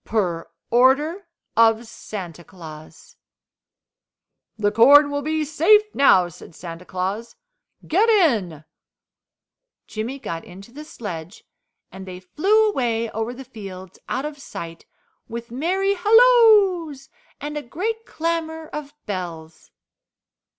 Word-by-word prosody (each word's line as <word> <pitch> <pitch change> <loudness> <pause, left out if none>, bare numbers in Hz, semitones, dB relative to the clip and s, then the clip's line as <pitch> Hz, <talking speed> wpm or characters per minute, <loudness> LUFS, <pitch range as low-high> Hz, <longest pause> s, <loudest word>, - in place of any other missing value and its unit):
Per 180 -7 -2 0.2
order 290 +10 +3 0.3
of 225 0 +4
Santa 180 -6 -8
Claus. 160 -4 -13 1.4
"The 205 -1 +1
corn 285 +7 +6
will 285 0 -2
be 310 +1 -1
safe 420 +8 +3
now," 190 -10 +5
said 170 -1 -14
Santa 170 0 -9
Claus, 195 +6 -4 0.5
"get 405 +8 +2
in." 225 - +2 1.2
Jimmy 225 +5 -5
got 170 -11 -6
into 195 +5 -13
the 295 +4 -9
sledge 180 - -8 0.5
and 190 +1 -10
they 180 -1 -8
flew 390 - +2
away 230 - -1
over 225 +2 -3
the 260 +2 -10
fields, 195 -7 -10
out 260 +3 -2
of 300 -1 -7
sight, 165 -10 -9 0.4
with 235 0 -7
merry 370 +10 0
halloos 410 - +4 0.3
and 295 +1 -6
a 295 - -3
great 440 - -4
clamour 320 -1 -3
of 295 -1 -7
bells. 165 - -7
245 Hz, 115 wpm, -22 LUFS, -, 1.4 s, corn